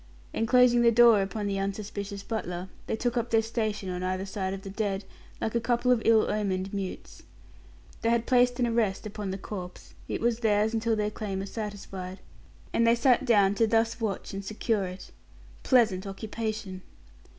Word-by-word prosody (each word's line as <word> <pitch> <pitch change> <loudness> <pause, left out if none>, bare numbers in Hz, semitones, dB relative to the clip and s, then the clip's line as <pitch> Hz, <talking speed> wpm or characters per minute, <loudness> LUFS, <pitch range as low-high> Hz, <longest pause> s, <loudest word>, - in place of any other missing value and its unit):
And 225 - 0
closing 250 0 +5
the 235 -1 +5
door 230 -2 +7
upon 205 +2 -3
the 200 -1 -1
unsuspicious 200 0 -4
butler, 180 -5 -4 0.2
they - - 0
took 245 +2 -1
up 235 0 -1
their 225 -1 +3
station 215 -3 -2
on 180 0 -4
either 185 +1 -2
side 190 -1 -3
of 195 0 -6
the 195 - -7
dead, 200 -1 -2 0.3
like 220 - -2
a 235 - +2
couple 240 +2 +1
of 245 -3 +3
ill 225 -1 +6
omened 195 -2 -1
mutes. 195 -2 -6 0.8
They 230 - +1
had 235 0 +2
placed 245 0 +3
an 245 - +3
arrest 230 -5 0
upon 210 -1 -5
the 190 - -3
corpse; 185 -2 -8
it - - -2
was 235 0 +1
theirs 215 -1 +2
until 225 0 +1
their 210 0 -1
claim 205 -3 -4
was 195 +1 -5
satisfied, 195 -3 -6 0.5
and 230 - +3
they 230 - +6
sat 250 +2 +3
down 205 -5 +4
to 225 +2 +2
thus 225 +1 +1
watch 205 -4 -3
and 195 0 -4
secure 215 0 -1
it. 185 +1 -8 0.5
Pleasant 215 -7 +3
occupation! 210 -1 -5
215 Hz, 185 wpm, -28 LUFS, 195-230 Hz, 0.8 s, door